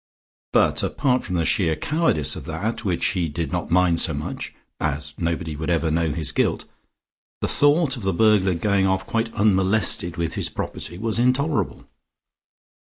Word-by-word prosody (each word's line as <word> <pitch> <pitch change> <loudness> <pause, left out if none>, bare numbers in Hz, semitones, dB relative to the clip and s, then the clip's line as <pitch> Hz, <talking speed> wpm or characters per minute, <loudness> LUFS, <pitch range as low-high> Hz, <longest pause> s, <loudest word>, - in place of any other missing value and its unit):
But - - +3
apart 130 -3 0
from 90 - -4
the 85 -2 +1
sheer 85 -8 +2
cowardice 110 - 0
of - - -8
that, 95 +11 -3
which 90 -5 +1
he 90 -3 -1
did 80 +2 -4
not 90 -2 -3
mind 90 -1 +3
so 80 -4 0
much, 75 - -5 0.3
as 75 -1 -2
nobody 85 -1 -2
else 75 - -7
would 80 - -3
ever 80 -2 +1
know 80 -1 +1
his 80 +1 -2
guilt, - - 0 0.7
the - - -1
thought 145 -1 +3
of - - -7
the 95 -1 0
burglar 95 -1 +3
going 100 +2 +1
off 95 0 0
quite 115 +2 -1
unmolested 95 -3 +2
with 85 -1 -2
his - - -2
property 85 - -6
was 115 +2 -2
intolerable. 135 +5 0
90 Hz, 175 wpm, -23 LUFS, 80-110 Hz, 0.7 s, But